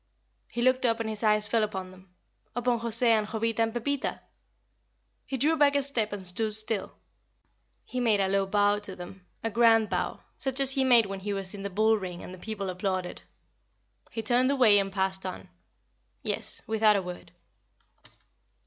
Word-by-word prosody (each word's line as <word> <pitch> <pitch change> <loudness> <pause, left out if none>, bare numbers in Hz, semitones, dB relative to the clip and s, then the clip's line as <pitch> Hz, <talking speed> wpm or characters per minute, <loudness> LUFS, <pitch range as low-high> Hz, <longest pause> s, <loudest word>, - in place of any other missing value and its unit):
He 240 - -2
looked 255 +1 +2
up 230 -2 +1
and 225 - -3
his 215 -1 -4
eye 215 -1 +4
fell 215 +2 +1
upon 190 -3 -4
them 185 0 -18 0.5
upon 245 -1 0
José 230 +1 -2
and 215 -2 +2
Jovita 225 +1 -2
and 225 0 +1
Pepita! 260 +4 -2 1.1
He 265 - -3
drew 300 +6 +2
back 285 -2 +3
a 280 - +2
step 235 -6 -2
and 200 -2 -5
stood 210 +4 +3
still; 215 -1 +2 0.9
he 255 - -5
made 225 -4 +2
a 195 - +2
low 195 0 0
bow 205 +1 +2
to 200 -2 -6
them, 180 +1 -11 0.2
a 225 - -2
grand 225 -1 +4
bow, - - -2 0.2
such 265 -2 -1
as 270 -1 +5
he 270 0 +2
made 240 -4 +5
when 195 -1 -6
he 205 +1 -4
was 195 -1 -3
in 200 - -7
the 200 - -4
bull 215 +3 +2
ring 180 -3 -7
and 180 - -9
the 185 - -11
people 200 -2 -4
applauded. 185 -1 -3 0.9
He 225 - -5
turned 245 +3 +2
away 245 -7 +5
and 195 0 -2
passed 190 -1 -1
on. 185 -1 -7 0.7
Yes, - - -2
without 220 -1 +3
a 200 - +1
word. 180 0 -9
215 Hz, 185 wpm, -27 LUFS, 195-235 Hz, 1.1 s, as